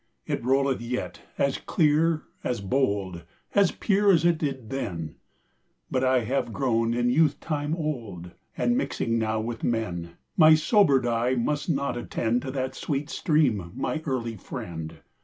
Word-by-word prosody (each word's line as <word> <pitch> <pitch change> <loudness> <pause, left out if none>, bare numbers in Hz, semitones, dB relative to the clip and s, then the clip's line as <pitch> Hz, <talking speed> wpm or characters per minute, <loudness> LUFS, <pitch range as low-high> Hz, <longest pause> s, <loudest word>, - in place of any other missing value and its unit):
It - - -2
rolleth 135 0 +2
yet, 125 +1 -4 0.2
as 140 -1 +1
clear, 155 0 +2 0.2
as 125 -1 -1
bold, 100 -6 -1 0.3
As 200 -3 +4
pure 205 -1 +3
as 170 -2 +3
it 170 -2 +3
did 135 -7 -3
then; 85 - -4 0.8
But 130 - +1
I 130 -1 +3
have 125 +1 -1
grown 115 -2 +1
in 120 0 +2
youth 150 +1 +3
time 150 0 -2
old, 115 - -4 0.3
And, 240 - +2
mixing 115 - -1
now 110 0 0
with 115 +1 -4
men, 90 -7 -2 0.2
My 155 -1 +8
sobered 155 - +4
eye 120 +2 +1
must 145 +6 -1
not 140 -4 0
attendTo 120 +2 -1
that 130 -1 -2
sweet 145 +2 -3
stream, 125 - +1
my 155 +4 -2
early 120 -6 -2
friend! 80 -3 -7
130 Hz, 150 wpm, -26 LUFS, 115-150 Hz, 0.8 s, My